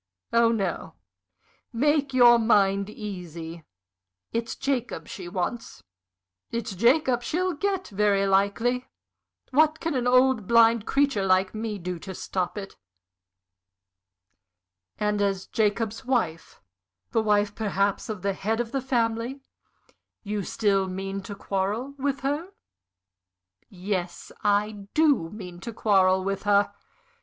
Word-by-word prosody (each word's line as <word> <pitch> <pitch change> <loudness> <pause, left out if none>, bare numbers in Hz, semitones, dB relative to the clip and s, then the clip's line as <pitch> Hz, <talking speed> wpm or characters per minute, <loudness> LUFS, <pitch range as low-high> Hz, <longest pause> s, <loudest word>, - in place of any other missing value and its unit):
Oh 230 0 +5
no 195 - -2 0.8
make 285 +3 +1
your 240 -2 +7
mind 200 -3 +3
easy. 170 -6 -7 0.7
It's 230 0 -2
Jacob 260 -3 -2
she 180 -4 -7
wants 180 - -4 0.7
it's 230 -3 -3
Jacob 245 - +3
she'll 360 +8 -1
get, 385 +3 -2
very 200 -1 +2
likely. 200 +6 +1 0.6
What 310 +3 +3
can 330 -1 -2
an 250 -2 0
old, 255 -4 +4
blind 230 -1 +5
creature 275 -7 +2
like 190 0 +2
me 215 -1 -3
do 180 -1 -5
to 190 +2 -8
stop 185 +3 -3
it?" 195 -1 -7 2.2
"And 210 0 0
as 195 -1 0
Jacob's 220 +1 -1
wife 225 -11 -2 0.5
the 225 - +2
wife 210 -1 +2
perhaps 200 -1 -1
of 210 -4 -5
the 200 0 +1
head 220 +4 -2
of 235 -1 -2
the 270 0 -1
family 240 +1 -1 0.8
you 210 -1 -2
still 195 0 +1
mean 195 +1 -4
to 200 +1 -8
quarrel 205 +7 -2
with 275 0 -1
her?" 290 +6 -2 1.2
"Yes, 185 -2 -4
I 205 0 0
do 290 - +3
mean 180 -3 -9
to 235 - -6
quarrel 190 -4 +3
with 195 0 -2
her!" 205 0 +2
210 Hz, 125 wpm, -26 LUFS, 195-245 Hz, 2.2 s, your